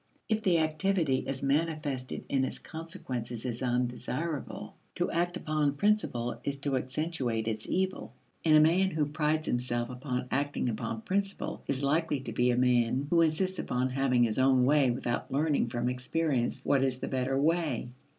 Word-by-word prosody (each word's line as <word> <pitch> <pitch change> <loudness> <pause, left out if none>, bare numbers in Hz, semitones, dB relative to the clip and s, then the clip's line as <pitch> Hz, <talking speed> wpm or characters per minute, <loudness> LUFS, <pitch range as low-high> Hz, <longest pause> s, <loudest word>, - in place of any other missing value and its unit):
If 220 -1 +1
the 185 -5 +3
activity 155 -2 +1
as 135 0 -3
manifested 145 -2 -1
in 135 -1 +1
its - - -2
consequences 130 - -6
is 120 -2 -3
undesirable, 125 +5 -2 0.2
to - - -1
act 175 +2 0
upon 150 -4 0
principle 145 - +1
is 140 0 -2
to 140 -1 0
accentuate 130 -4 -2
its 110 -1 -2
evil. 190 0 -1 0.3
And 155 -2 +6
a - - +7
man 175 +5 +4
who 155 -4 0
prides 155 +1 0
himself 120 0 -1
upon 125 0 -3
acting 140 -2 0
upon 115 - -3
principle 195 -1 -2
is 140 0 -1
likely 150 +1 +1
to - - -6
be 125 0 +2
a 120 - +2
man 125 +1 +2
who 170 -1 +5
insists 185 +4 +1
upon 125 +1 0
having 130 -2 +2
his 115 +1 +1
own 130 -1 +4
way 140 -1 +4
without 120 0 -2
learning 145 -2 +1
from 120 +1 -2
experience 125 +1 -1
what 135 -2 +3
is 130 -2 0
the 130 - -4
better 130 +1 0
way. 150 -6 0
140 Hz, 170 wpm, -30 LUFS, 125-160 Hz, 0.3 s, a